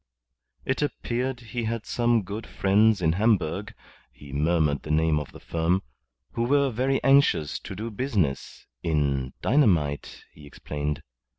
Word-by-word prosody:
It 130 - -1
appeared 125 -3 -2
he 115 0 -4
had 115 0 -3
some 120 -2 +1
good 105 +4 -6
friends 100 0 +3
in 80 - +4
Hamburg 100 -2 0 0.4
(he 70 -1 -13
murmured 75 -1 +1
the - - -10
name 80 0 +2
of 75 - -7
the - - -12
firm) 85 +3 0 0.5
who 115 - -3
were 140 +1 +3
very 130 +4 +1
anxious 135 - +3
to - - -8
do 110 +4 -5
business, 100 - -2 0.2
in 70 -5 0
dynamite, 85 - +1
he 75 -1 -14
explained. 75 +1 -4
95 Hz, 140 wpm, -26 LUFS, 75-120 Hz, 0.5 s, in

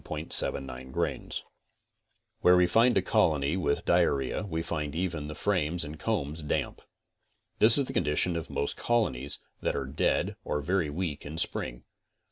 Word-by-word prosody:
81 80 - -5
CONSTRUCTIVE - - +6
BEEKEEPING 65 -1 -8
37 - - -2 1.1
Where 90 0 +6
we 90 - +5
find 115 +6 +3
a 95 - +2
colony 75 -3 +2
with 75 -6 -1
diarrhea 70 -2 +1
we 80 0 -2
find 75 -3 -4
even 85 -4 -3
the 75 - -7
frames 90 -4 0
and 75 +1 -7
combs 75 +3 -2
damp. 75 - -3 0.8
This 110 +4 +8
is 140 - +3
the - - -7
condition 75 +4 +1
of 80 -2 -4
most 70 - -2
colonies 75 - -1 0.2
that - - -1
are 70 - -2
dead 65 - 0
or - - -2
very 85 +1 0
weak 75 -1 -4
in 75 +2 -7
spring. - - -2
80 Hz, 165 wpm, -28 LUFS, 70-90 Hz, 1.1 s, This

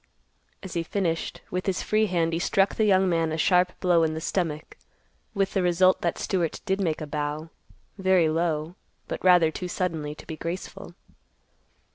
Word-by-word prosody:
As 190 - -7
he 170 - 0
finished, 165 -1 -2
with 180 +2 -3
his 190 -1 0
free 215 0 +2
hand 165 -3 0
he 165 - 0
struck 195 +2 +2
the 220 - +1
young 190 -2 +4
man 165 -2 +1
a 160 - -2
sharp 180 +2 +2
blow 175 -2 +3
in 160 -1 +1
the - - -3
stomach, 160 -2 -3 0.6
with 195 -1 0
the 195 - +1
result 180 +1 +3
that 170 - -1
Stewart 175 -5 -1
did 195 -1 0
make 160 -5 -1
a - - -3
bow, 150 +2 -4 0.5
very 185 -3 +3
low, 160 0 -1 0.3
but - - -5
rather 175 -3 +5
too 180 - -5
suddenly 160 -5 -3
to - - -13
be 160 - -6
graceful. 170 +4 -6
175 Hz, 180 wpm, -26 LUFS, 160-185 Hz, 0.6 s, rather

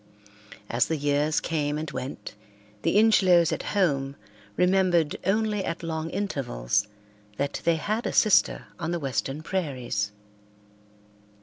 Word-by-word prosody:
As 120 0 +1
the 160 - 0
years 145 +1 +1
came 150 -2 -1
and 155 0 -4
went 130 - -6 0.5
the - - +2
Ingelows 185 -6 +5
at - - -2 0.2
home 140 -7 +1 0.4
remembered 180 -4 +3
only 210 0 +1
at 170 -1 -4
long 160 -1 -3
intervals 105 - -1 0.5
that 140 0 -2
they 170 - +4
had 215 +8 -2
a - - -1
sister 205 -6 +3
on 165 -1 -3
the 170 0 -1
western 135 +1 -3
prairies. 130 - -2
160 Hz, 125 wpm, -26 LUFS, 140-185 Hz, 0.5 s, Ingelows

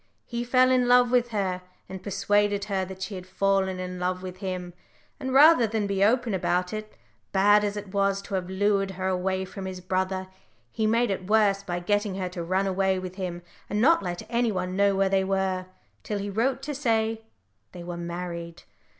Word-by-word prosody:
He 235 0 -3
fell 255 +1 +4
in 250 -1 +3
love 245 0 +5
with 245 -1 +3
her, 190 -4 -1 0.3
and 190 -1 -8
persuaded 205 +1 +1
her 195 -2 -1
that 190 0 -7
she 190 - -5
had 185 -1 -7
fallen 190 0 +1
in 180 0 -5
love 180 +1 -2
with 185 0 -7
him, 185 -2 -5 0.5
and 260 -1 -3
rather 280 -2 +7
than 215 -1 -1
be 200 -1 +1
open 235 +1 +2
about 180 0 0
it, 215 0 -7 0.3
bad 205 +2 +5
as 205 0 -2
it 205 -1 -7
was 195 0 +2
to 200 - -9
have 185 -1 -2
lured 195 0 +1
her 185 0 -2
away 190 0 -1
from 190 0 -7
his 185 -1 -6
brother, 185 +1 -2 0.4
he 220 - 0
made 230 +1 +2
it 185 0 -4
worse 210 -2 +3
by 175 -3 -3
getting 205 +2 0
her 185 -1 -3
to 180 -1 -6
run 185 +3 0
away 190 0 +1
with 185 -1 -5
him, 175 -2 -4 0.3
and 205 - -1
not 320 +9 +5
let 175 -2 -4
any 235 0 +1
one 185 -1 -3
know 200 0 +3
where 195 0 +2
they 190 0 +2
were, 190 -1 -1 0.3
till 210 - -3
he 200 0 -4
wrote 255 +6 0
to 295 +1 -3
say 225 -5 0 0.5
they 175 -1 -9
were 175 0 -5
married. 170 0 -6
195 Hz, 205 wpm, -26 LUFS, 185-215 Hz, 0.5 s, rather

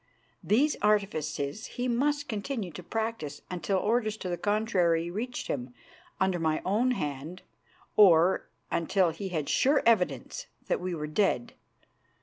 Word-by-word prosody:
These 280 +8 +2
artifices 195 -5 0
he 250 +1 0
must 285 +4 +1
continue 215 -3 -3
to 155 - -8
practise 220 -7 -4
until 185 +2 -1
orders 215 +2 0
to 185 - -5
the 175 - 0
contrary 180 -5 +1
reached 240 +6 -4
him 125 -2 -4 0.4
under 190 -2 +1
my 160 -1 +1
own 220 +7 +2
hand, 150 - -4 0.5
or 185 -3 +5 0.2
until 175 +1 +2
he 190 +4 -5
had 155 -5 -2
sure 280 +3 +3
evidence 230 - +1 0.2
that - - -1
we 180 -1 -2
were 150 -2 -4
dead. 150 - 0
190 Hz, 135 wpm, -29 LUFS, 165-225 Hz, 0.5 s, or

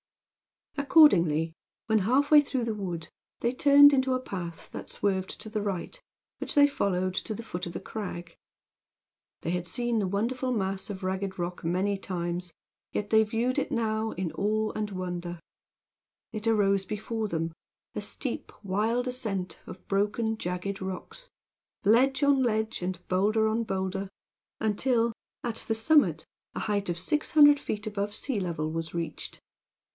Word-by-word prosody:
Accordingly, 170 - +5 0.3
when 220 -1 +3
half 260 +9 +2
way 300 -1 +9
through 265 -4 -2
the 225 - -1
wood, 175 -6 -5 0.3
they 235 +1 +1
turned 285 +1 +7
into 260 -1 +2
a - - 0
path 175 -8 -6
that - - -7
swerved 190 -2 -1
to - - -7
the 215 -1 -2
right, 205 - -4 0.4
which - - -3
they 285 -1 +8
followed 185 -9 0
to 215 +3 -3
the 230 - -7
foot 180 -5 -5
of 170 - -6
the - - -4
crag. 175 -5 -6 1.1
They 165 - -2
had 180 0 -2
seen 240 +5 0
the 200 - 0
wonderful 240 +7 -1
mass 195 -4 -2
of 195 -1 -6
ragged 190 +1 -2
rock 175 0 -4
many 190 +4 0
times, 175 -1 -3 0.4
yet 205 - -3
they 220 0 +6
viewed 230 +4 0
it - - -3
now 220 -1 0
in 180 -2 -3
awe 215 +1 0
and 215 -1 -2
wonder. 175 -2 -4 0.9
There 215 - -4
it 215 - -4
arose 200 -3 +3
before 215 +2 -3
them, 165 -3 -2 0.4
a - - -3
steep, - - -2
wild 220 +6 0
ascent 200 -8 -3
of 185 - -11
broken, 210 +3 0
jagged 180 0 -4
rocks 190 - -6 0.6
ledge 265 +6 +4
on 280 -1 +4
ledge 220 -4 0
and 180 0 -2
bowlder 215 +4 +2
on 225 +2 +1
bowlder 190 -1 -2 0.5
until, 230 +2 +1 0.3
at 235 -2 -2
the 225 - +1
summit, 295 +7 +3 0.3
a - - -3
height 205 -3 -1
of 175 - -1
600 295 - +5
feet 210 -6 -4
above 205 -1 -3
sea 250 -3 -1
level 160 -4 -2
was 165 0 -4
reached. 170 -1 -5
205 Hz, 160 wpm, -28 LUFS, 185-230 Hz, 1.1 s, way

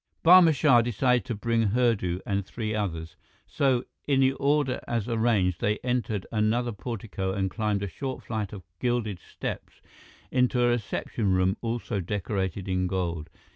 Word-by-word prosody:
Barma 175 -1 +8
Shah 130 -4 +5
decided 120 +2 +1
to 120 -3 -3
bring 115 +2 0
Hurdu 100 -6 +1
and 100 -1 -1
three 110 +2 -4
others. 85 -6 -3 0.3
So, 130 -3 +1 0.2
in 140 -2 +3
the 130 0 +5
order 140 -1 +1
as 115 -2 -1
arranged, 110 -7 +1
they 105 +1 +1
entered 120 -5 -1
another 115 +3 +1
portico 100 -3 -4
and 95 -1 -1
climbed 105 -2 -1
a - - -1
short 130 +9 -5
flight 110 -4 -3
of 100 -3 -8 0.2
gilded 120 -6 -1
steps - - -7 0.5
into 125 -1 +2
a 120 0 +4
reception 110 -2 -1
room 95 +1 +2
also 115 -2 -2
decorated 95 0 -3
in 95 -1 0
gold. 85 -4 -2
110 Hz, 155 wpm, -27 LUFS, 95-120 Hz, 0.5 s, Barma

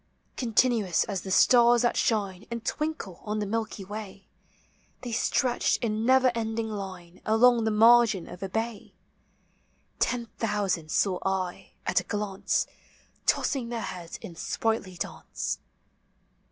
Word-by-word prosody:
Continuous 230 -6 +2
as 200 -5 -3
the 190 - -7
stars 240 +4 +5
thai 240 - +3
shine 200 -4 0
And 235 -1 -5
twinkle 305 - -3
on 210 0 -2
the 210 - -1
Milky 215 -1 -3
Way, 200 -1 -8 0.8
They 245 - -5
stretched 245 +1 +1
in 220 0 0
never 260 -1 +5
ending 225 -1 -2
line 185 -4 -7
Along 230 +2 +4
the - - +2
margin 220 -3 +5
of 180 - -10
a 195 - -3
bay: 225 +1 -4 1.0
Ten 245 -2 0
thousand 200 -7 -1
saw 185 +2 +1
1. 190 -2 -2 0.2
a1 - - +3
a - - -5
glance, 205 -1 -1 0.6
Tossing 255 -4 +1
their 235 -1 -3
heads 175 -5 -6
in 170 - -8
sprightly 220 +1 -2
d;in<e. - - -4
215 Hz, 135 wpm, -27 LUFS, 190-235 Hz, 1.0 s, stars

